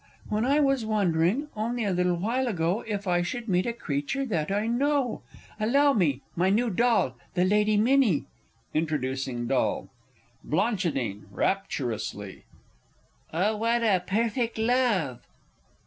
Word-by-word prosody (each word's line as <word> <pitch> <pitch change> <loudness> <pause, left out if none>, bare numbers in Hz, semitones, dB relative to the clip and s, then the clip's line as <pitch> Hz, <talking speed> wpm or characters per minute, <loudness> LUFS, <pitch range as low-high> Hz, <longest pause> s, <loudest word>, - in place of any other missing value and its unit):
When 215 +2 0
I 280 +3 +3
was 275 -4 +2
wondering, 205 - +1
only 230 +2 -2
a 200 - +1
little 180 0 +1
while 235 +9 -1
ago, 180 0 0
If 205 -2 -3
I 175 -1 +2
should 235 +7 -4
meet 185 0 +1
a - - +1
creature 155 - -2
that 170 -8 -1
I 205 +2 0
know; 255 +1 0 0.4
Allow 280 +6 +4
me 150 - +1
my 180 +2 +2
new 225 +4 +2
doll, 225 - +2 0.2
the 180 0 +3
Lady 210 +2 +3
Minnie! 230 - +3 0.5
[Introducing 135 -5 -1
doll. - - 0 0.5
Bl. 155 - 0 0.7
(rapturously). 110 - -3 0.9
Oh, 200 +7 +1
what 230 +2 +1
a 195 -5 +3
perfect 230 +3 0
love! 220 - +1
210 Hz, 130 wpm, -27 LUFS, 170-235 Hz, 0.9 s, Allow